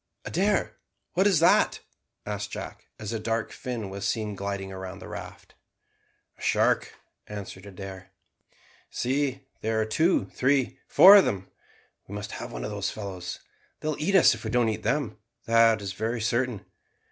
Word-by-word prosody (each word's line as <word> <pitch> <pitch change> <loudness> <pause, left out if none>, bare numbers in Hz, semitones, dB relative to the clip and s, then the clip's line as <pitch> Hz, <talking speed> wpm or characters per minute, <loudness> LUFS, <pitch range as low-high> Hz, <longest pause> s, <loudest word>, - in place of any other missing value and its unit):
"Adair, 195 +3 0 0.4
what 190 +4 +4
is 195 -4 +4
that?" 165 +3 +4 0.5
asked 105 0 -4
Jack, - - -8
as 110 +1 -5
a 115 - -2
dark 115 +1 -2
fin 120 -5 -5
was 100 +1 -4
seen 105 -2 -1
gliding 100 0 -4
round 95 -1 -7
the - - -10
raft. - - -9 0.9
"A - - -16
shark," - - +2 0.3
answered 100 -1 -8
Adair. 95 -1 -9 0.8
"See, 135 +1 -1 0.2
there 110 0 0
are 110 - +1
two, 160 +11 +2
three, 135 0 +1
four 200 +2 +10
of 195 - +6
them. 95 -1 -3 0.6
We 100 - -7
must 105 0 -5
have - - -6
one - - -5
of - - -4
those - - -2
fellows. 95 -4 -6 0.4
They 155 - -3
will 150 - -3
eat 195 +6 +1
us 190 - +7
if - - -8
we - - -3
don't 120 -2 +2
eat 110 - -3
them, 135 -6 -1 0.3
that 115 -2 +4
is 95 -1 -4
very 115 +4 -2
certain. 120 0 -1
110 Hz, 170 wpm, -27 LUFS, 100-135 Hz, 0.9 s, four